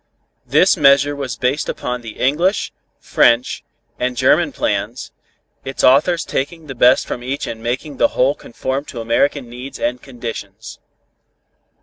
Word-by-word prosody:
This - - +4
measure 140 +1 +4
was 130 -5 -5
based 130 +5 -1
upon 125 0 -3
the 115 -2 -9
English, 170 +10 +1 0.3
French 120 +2 +2 0.4
and 125 0 -2
German - - +3
plans, - - -3 0.5
its 135 0 -4
authors 155 +6 +4
taking 155 +4 -3
the 135 - -7
best 125 +1 +4
from 120 - -5
each 135 +3 -3
and 115 -1 -6
making 130 +5 -4
the - - +4
whole 130 +3 +4
conform 130 +1 -4
to 125 - -8
American 120 +4 0
needs 125 +3 -8
and 125 +1 -2
conditions. 115 -5 -8
130 Hz, 140 wpm, -18 LUFS, 120-140 Hz, 0.5 s, This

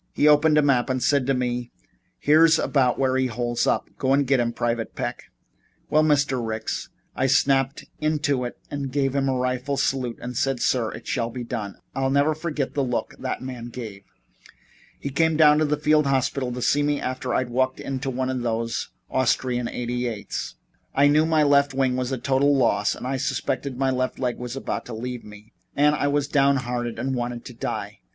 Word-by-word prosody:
He 150 - +3
opened 150 +1 +5
a 150 - +5
map 135 -2 +2
and 130 -1 0
said 140 -3 +2
to 135 - +2
me: 125 -1 -2 0.5
'Here's 160 +2 +5
about 130 -6 +2
where 130 -1 +1
he 130 0 +2
holes 120 0 -1
up. - - +1
Go 135 0 +3
get 135 -1 +2
him, 120 -1 +1
Private 115 -1 -2
Peck.' - - -4 0.7
Well, 155 - +5
Mr. 145 -5 +2
Ricks, 110 -1 -3 0.3
I 130 - +1
snapped 135 0 +2
into 145 -4 0
it 120 - -5
and 140 -2 -3
gave 135 -1 0
him 135 -1 +1
a 130 - +1
rifle 130 +2 -1
salute, 130 -4 -1
and 125 +1 -6
said, 135 +1 0
'Sir, 120 -3 +1
it - - -10
shall 115 -3 -1
be 125 +1 -6
done' 105 -4 -5
and - - -32 0.2
I'll 135 - +2
never 140 +3 +3
forget 155 -3 -3
the 140 - 0
look 125 -2 -2
that 130 0 -4
man 125 -2 -6
gave 115 -4 -7
me. 95 - -38 0.9
He 140 - -4
came 160 +2 +2
down 150 -1 +6
to 155 - +3
the 150 0 0
field 150 0 +3
hospital 130 -1 0
to 125 0 -4
see 145 - +3
me 145 0 +1
after 130 0 -3
I'd 125 -1 -1
walked 130 +1 0
into 135 0 -3
one 130 0 -1
of 130 -1 -2
those 115 -1 -2 0.2
Austrian 125 -2 +1
88's. 120 -3 -4 0.4
I 140 - +5
knew 155 +2 +4
my 160 -2 +3
left 140 -1 +3
wing 130 -2 +1
was 130 0 -2
a 130 - -1
total 135 +3 +2
loss 105 -5 +2
and - - -8
I 135 +1 -1
suspected 130 0 -2
my 135 0 +1
left 130 0 -1
leg 125 -2 -2
was 125 0 -5
about 135 - -3
to 120 - -6
leave 125 +1 -5
me, 105 +1 -14 0.2
and 150 +1 +4
I 145 -1 0
was 145 0 +1
downhearted 125 -5 +1
and 130 +3 -2
wanted 120 -1 -3
to 125 - -8
die. 115 - -5
130 Hz, 205 wpm, -24 LUFS, 125-140 Hz, 0.9 s, down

